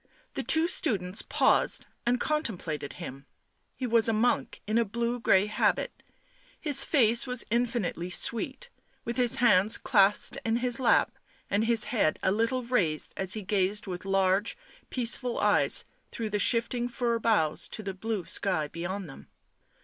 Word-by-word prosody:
The - - -3
two 320 +1 +4
students 210 - -1
paused - - +1 0.2
and 245 +1 +2
contemplated 180 - -3
him; 140 -5 -9 0.5
he 260 - -4
was 230 -2 +3
a - - +1
monk 230 +3 0
in 215 +2 +1
a - - +3
blue 235 +3 -3
grey 190 -3 +3
habit; 210 - -1 0.6
his 285 -3 +3
face 235 -4 +2
was 250 -1 0
infinitely 230 -8 -1
sweet; 235 - 0 0.3
with 235 +2 -4
his 245 -2 +3
hands 215 -3 +4
clasped 205 -3 +2
in 225 -2 0
his 245 0 0
lap 255 - +3 0.4
and 210 +2 +1
his 230 -2 +4
head 210 -11 0
a 190 - +2
little 230 +5 0
raised 190 -11 0 0.2
he 215 - -5
gazed 200 +1 -1
with 180 -2 -6
large, 195 - +1 0.3
peaceful 245 0 -2
eyes - - +1 0.2
through 220 -2 -5
the 205 - -1
shifting 240 +2 +2
fir 235 -1 -1
boughs 205 -10 0
to 215 - -6
the 195 -1 -4
blue 205 -1 -4
sky 180 -7 -1
beyond 175 +4 -5
them. 135 - -13
225 Hz, 155 wpm, -28 LUFS, 190-240 Hz, 0.6 s, two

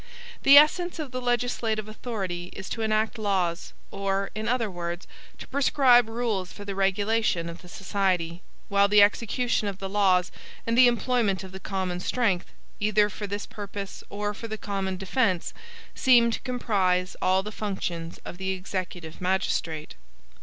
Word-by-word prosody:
The 275 +1 +8
essence 350 +5 +5
of 300 -5 -5
the 255 0 -4
legislative 240 -3 -1
authority 200 -6 -4
is 190 - -7
to 225 - -4
enact 220 +1 0
laws, 190 -5 -1 0.2
or, 195 0 -1
in 215 +2 -4
other 230 -3 0
words, 175 0 -5 0.3
to - - -10
prescribe 260 -4 +4
rules 225 -6 -2
for 205 - -10
the 200 - -4
regulation 195 -1 +1
of 170 +1 -8
the 180 - -14
society; 185 -3 -1 0.3
while 200 0 +4
the 205 0 +7
execution 230 +2 +1
of 195 -2 -4
the 195 - -5
laws, 190 -3 +2 0.3
and 230 - 0
the 250 +1 +8
employment 235 -5 +1
of 190 - -9
the 190 - -8
common 190 -2 -3
strength, 200 -2 0 0.3
either 210 0 +3
for 205 0 -5
this 205 +1 -4
purpose 200 -1 -7
or 205 +1 -3
for 230 +2 -7
the 220 0 -5
common 195 -2 -3
defense, 190 -2 0 0.4
seem 240 -3 +5
to - - -2
comprise 195 -8 0
all 185 +1 +3
the 210 - -6
functions 180 -6 -4
of 175 - -8
the 190 0 -2
executive 180 -3 -6
magistrate. 175 -4 -1
200 Hz, 160 wpm, -26 LUFS, 185-230 Hz, 0.4 s, The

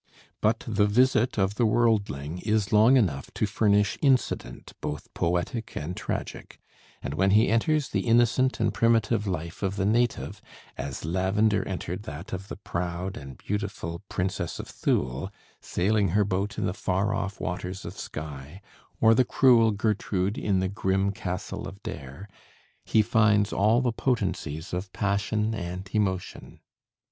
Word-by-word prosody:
But 110 +2 +2
the 105 -2 +2
visit 125 +2 +3
of 95 0 +2
the - - +5
worldling 100 -10 +1
is 105 0 0
long 110 +5 +6
enough 75 - 0
to - - +1
furnish 105 -1 +2
incident 135 -3 0
both 75 0 -5
poetic 90 +7 -2
and 85 +4 -4
tragic; - - -5 0.5
and 70 - -3
when 95 +6 +2
he 105 +4 +5
enters 140 +6 +2
the - - -1
innocent 120 +3 +3
and - - +1
primitive 115 -2 +2
life 85 -3 -4
of 95 -1 -1
the 95 - 0
native, 120 +3 0 0.3
as 70 +1 -5
Lavender 95 +4 +2
entered 90 0 -4
that 85 +10 -8
of 95 +1 -5
the - - -6
proud 90 0 -4
and 70 -2 -9
beautiful 100 -4 -4
Princess 90 -2 -2
of - - -7
Thule 65 +10 -1 0.3
sailing 100 +2 +1
her 105 - +4
boat 100 +2 -2
in - - -1
the 90 - -1
far 95 +2 0
off 100 0 -3
waters 90 +2 -4
of - - -7
Skye, 75 +2 -7 0.4
or 110 0 +6
the 125 - +4
cruel 120 -2 +5
Gertrude 105 -2 0
in 95 -3 0
the 95 - 0
grim 95 0 0
castle 90 -3 -5
of 100 +2 -11
Dare, 70 +7 -7 0.6
he 110 - +3
finds 110 -2 +3
all 110 +5 +3
the 125 -2 +1
potencies 95 - -2
of 90 +1 -3
passion 105 +2 0
and 90 -1 -5
emotion. 95 -4 -2
100 Hz, 155 wpm, -27 LUFS, 90-110 Hz, 0.6 s, long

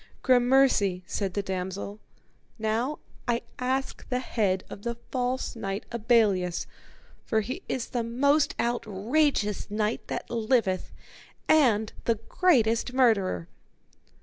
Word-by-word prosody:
Gramercy, 245 -7 +4
said 195 -2 -3
the 200 - 0
damosel; 190 +2 -4 0.6
now 225 +6 -1 0.3
I 235 -1 0 0.2
ask 260 +1 -2
the 250 - +1
head 205 -7 0
of - - -9
the 235 +2 -3 0.2
false 255 0 -1
knight 195 -2 -4
Abelleus, 210 -7 +2 0.6
for 220 - +1
he 255 - -5
is 255 -3 -2
the 245 - -1
most 280 +5 +2
outrageous 235 0 0
knight 210 +2 -1
that - - -4
liveth, 225 -5 0 0.6
and 230 -9 +4
the 230 - +3
greatest 230 - +2
murderer. 200 - +2
230 Hz, 115 wpm, -27 LUFS, 205-255 Hz, 0.6 s, Gramercy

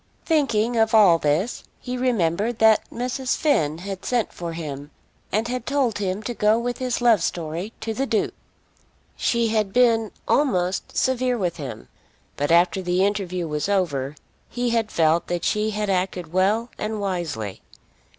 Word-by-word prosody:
Thinking 240 -8 +1
of 225 0 +3
all 190 -6 +6
this 155 +11 0 0.2
he 250 - -5
remembered 225 -3 0
that 220 -1 +4
Mrs. 250 +2 -2
Finn 160 - +1
had 190 +2 -6
sent 240 -4 0
for 170 -1 -5
him 145 -3 -6 0.4
and 220 +3 0
had 250 -1 -4
told 265 -6 +1
him 195 +1 -2
to 240 - -3
go 215 0 +3
with 245 +2 -3
his 250 -2 -1
love 230 -6 +5
story 170 +4 -3
to 225 - -3
the 270 +5 -2
Duke. 220 -4 0 0.8
She 235 -1 +1
had 215 -3 0
been 230 -2 +3 0.2
almost 185 -10 0
severe 255 -1 +1
with 180 -5 -2
him; 140 -5 -7 0.5
but 145 - -1
after 175 +2 +4
the 180 +1 +1
interview 185 -4 -2
was 150 +4 -2
over, 150 -8 0 0.3
he 245 0 -1
had 225 -2 +1
felt 165 +1 +2
that 175 -1 -2
she 210 +1 +1
had 210 0 -2
acted 180 -3 -2
well 210 +6 +1
and 215 0 -3
wisely. 170 - -3
210 Hz, 160 wpm, -23 LUFS, 175-235 Hz, 0.8 s, all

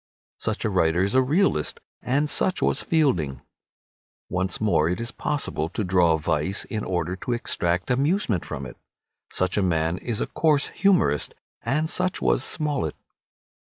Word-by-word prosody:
Such - - -2
a - - +2
writer 85 -1 +2
is 100 - 0
a 130 - +5
realist, 140 - +1 0.2
and 140 +4 +1
such 185 +5 +1
was - - +1
Fielding. 90 - +1 0.9
Once 95 +1 -1
more, 100 -7 +2
it 90 - -1
is 115 0 -3
possible 140 - -2
to 105 - -3
draw 90 -3 +3
vice 80 +5 -1
in 110 -1 -4
order 90 0 -1
to 120 - -2
extract 90 -5 0
amusement 135 - +1
from 70 -2 -6
it. 65 - -10 0.5
Such 90 +1 0
a - - +3
man 85 -1 +1
is 115 -4 -2
a - - 0
coarse 150 -3 +1
humorist, 190 - +2 0.3
and 150 +7 0
such 180 +2 0
was - - +2
Smollett. 145 - -1
100 Hz, 160 wpm, -25 LUFS, -, 0.9 s, a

